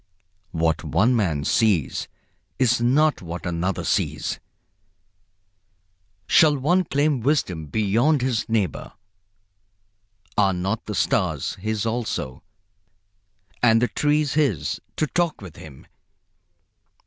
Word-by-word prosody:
What 80 -2 0
one 120 +5 +2
man 85 -10 0
sees 95 - +1 0.5
is 125 -2 +2
not 145 +6 +2
what 85 0 -7
another 85 +2 -2
sees. - - -1 1.9
Shall 150 +5 +5
one 175 +7 +2
claim 145 -3 +1
wisdom 95 - 0
beyond 115 - +1
his 120 -4 -1
neighbor? 105 - -1 1.4
Are 100 -2 +3
not 95 +5 -2
the - - -4
stars - - 0
his 110 0 -2
also, 110 - -3 1.2
and 115 -2 +5
the 125 - +1
trees 150 -1 +1
his, 140 - 0
to 155 - +1
talk 170 +1 -1
with 90 -6 -11
him? 70 -4 -12
115 Hz, 105 wpm, -23 LUFS, 90-140 Hz, 1.9 s, Shall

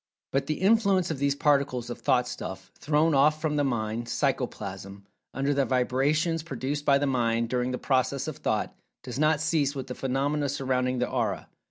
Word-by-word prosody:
But 135 0 0
the 155 +2 -2
influence 195 -4 +3
of 145 - -4
these 140 0 +1
Particles 140 -5 +1
of - - -6
"Thought 125 -3 +2
stuff" 95 -5 -7
thrown 155 +2 +1
off 150 +3 +4
from 155 -1 -1
the 145 - +2
Mind 115 -3 -2
Psychoplasm 100 -7 -3 0.3
under 135 +2 0
the 140 0 +2
vibrations 135 +7 +1
produced 145 -2 -4
by 140 -1 +5
the 145 - 0
Mind 115 -3 +1
during 125 0 0
the 125 - -2
process 135 +1 0
of 155 -2 -5
Thought, 110 -7 -1 0.3
does 125 0 -6
not 155 0 +3
cease 155 -3 +1
with 135 -2 -4
the - - -6
phenomena 140 +3 -1
surrounding 130 -2 0
the 125 - 0
Aura. 120 -3 -2
135 Hz, 185 wpm, -27 LUFS, 125-150 Hz, 0.3 s, by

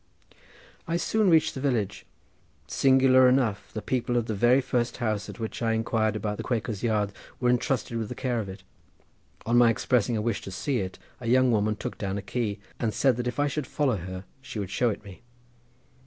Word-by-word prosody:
I 165 +1 0
soon 215 +3 +2
reached 160 -2 +4
the 130 - -6
village. 115 -8 -1 0.6
Singularly 130 -1 +5
enough, 125 -6 +1
the 110 - -5
people 125 -1 0
of 120 - +1
the 110 - -2
very 120 +6 +4
first 125 -2 -1
house, 110 -4 -2
at - - -9
which 110 +1 -5
I 115 -1 +1
inquired 110 -1 0
about 105 0 -2
the - - -4
Quakers' 115 -4 -2
Yard, 105 -3 +1 0.3
were 125 -1 +3
entrusted 125 -1 0
with 110 -2 -3
the - - -5
care 125 -3 -1
of 100 -3 -4
it. 95 0 -9 0.8
On 120 +1 +4
my 120 -1 +6
expressing 120 0 +1
a - - -1
wish 115 -2 -1
to - - -8
see 125 +7 -1
it 95 -1 -4 0.2
a 120 - -6
young 130 +1 +4
woman 105 -1 +2
took - - -6
down 100 -1 -2
a 100 - -5
key, 110 -1 -2 0.2
and 110 -4 -1
said 125 +2 +3
that 125 0 -2
if 125 - -3
I - - +4
would 150 -4 -2
follow 135 -7 +1
her 95 +1 -6 0.2
she 135 - -8
would 100 -2 -4
show 120 +2 +2
it 105 - -4
me. 100 -3 -12
115 Hz, 215 wpm, -27 LUFS, 105-125 Hz, 0.8 s, my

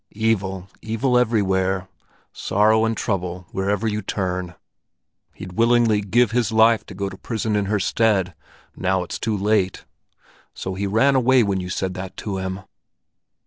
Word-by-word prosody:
"Evil, 95 -4 -1
evil 115 +4 0
everywhere; 95 -5 +1 0.5
sorrow 110 +2 +2
and 115 0 -1
trouble 90 -3 -3
wherever 100 +3 -1
you 105 0 -1
turn! 90 -3 -3 0.8
He'd 90 -1 -9
willingly 115 -1 +3
give 110 +3 +2
his 115 -3 +1
life 110 -1 +4
to 100 - -10
go 100 +1 -2
to 95 - -7
prison 110 +1 -3
in 105 -1 +1
her 105 +1 0
stead, 95 -3 +1 0.4
now 95 -1 0
it's 90 - -6
too 110 -2 -1
late! 100 -2 0 0.7
So 95 - -4
he 100 +2 -2
ran 115 +8 +3
away 130 -1 +4
when 100 -2 0
you 90 - -6
said 95 0 -2
that 95 0 -7
to 100 -3 -4
him? 95 +1 -4
100 Hz, 155 wpm, -22 LUFS, 95-110 Hz, 0.8 s, life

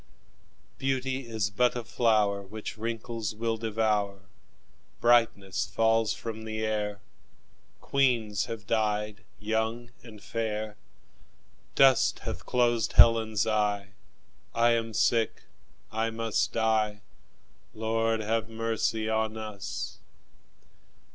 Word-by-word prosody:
Beauty 130 -1 -1
is 110 -3 -1
but 125 +5 +2
a 120 - -3
flower 105 -4 +2
Which 105 +3 -7
wrinkles 115 -1 -4
will 115 +1 -1
devour; 105 -3 0 0.8
Brightness 110 -7 +2
falls 115 +2 +2
from 110 -1 -5
the 110 0 -3
air; 105 -2 -2 0.8
Queens 115 -7 +1
have 115 -3 -7
died 105 0 -1 0.2
young 110 +2 -2
and 110 -3 -12
fair; 110 -1 -3 1.0
Dust 135 -1 +5
hath - - -5
closed 120 -2 +2
Helen's 110 -3 +5
eye; 105 -2 0 0.7
I 120 +1 +4
am 115 -1 -1
sick, 115 +2 +1 0.5
I 110 +1 0
must 115 -1 -1
die 110 -2 +1 0.7
Lord, 115 0 0
have 110 +1 -1
mercy 115 -1 -1
on 110 0 0
us! 105 -3 -6
110 Hz, 100 wpm, -28 LUFS, 105-115 Hz, 1.0 s, Dust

